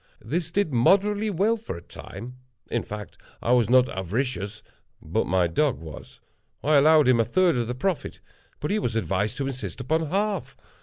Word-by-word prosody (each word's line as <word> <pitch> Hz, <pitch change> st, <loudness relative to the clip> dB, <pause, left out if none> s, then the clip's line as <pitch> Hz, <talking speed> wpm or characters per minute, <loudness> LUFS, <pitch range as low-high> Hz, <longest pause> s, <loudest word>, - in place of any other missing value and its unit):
This 165 Hz, +1 st, -2 dB
did 175 Hz, -4 st, 0 dB
moderately 200 Hz, -, +3 dB
well 205 Hz, +5 st, +1 dB
for 220 Hz, -, -7 dB
a -, -, -10 dB
time;—in 125 Hz, +4 st, -8 dB
fact, 105 Hz, -1 st, -8 dB, 0.2 s
I 120 Hz, -, -1 dB
was 120 Hz, -4 st, +4 dB
not 130 Hz, 0 st, +5 dB
avaricious, 105 Hz, +2 st, -3 dB, 0.4 s
but -, -, -1 dB
my 90 Hz, -1 st, +2 dB
dog 135 Hz, -, +1 dB
was. 80 Hz, -2 st, -11 dB, 0.4 s
I 150 Hz, +2 st, +4 dB
allowed 150 Hz, 0 st, +6 dB
him 125 Hz, -2 st, +5 dB
a -, -, +5 dB
third 175 Hz, -, +2 dB
of 120 Hz, -2 st, -1 dB
the 125 Hz, -, -3 dB
profit, 185 Hz, +5 st, -2 dB, 0.4 s
but 150 Hz, -, -2 dB
he 215 Hz, -, +1 dB
was 115 Hz, -, -2 dB
advised 105 Hz, +1 st, -1 dB
to 140 Hz, -, -2 dB
insist 130 Hz, -1 st, -5 dB
upon 160 Hz, +5 st, 0 dB
half. 200 Hz, +2 st, -2 dB
130 Hz, 175 wpm, -25 LUFS, 115-170 Hz, 0.4 s, allowed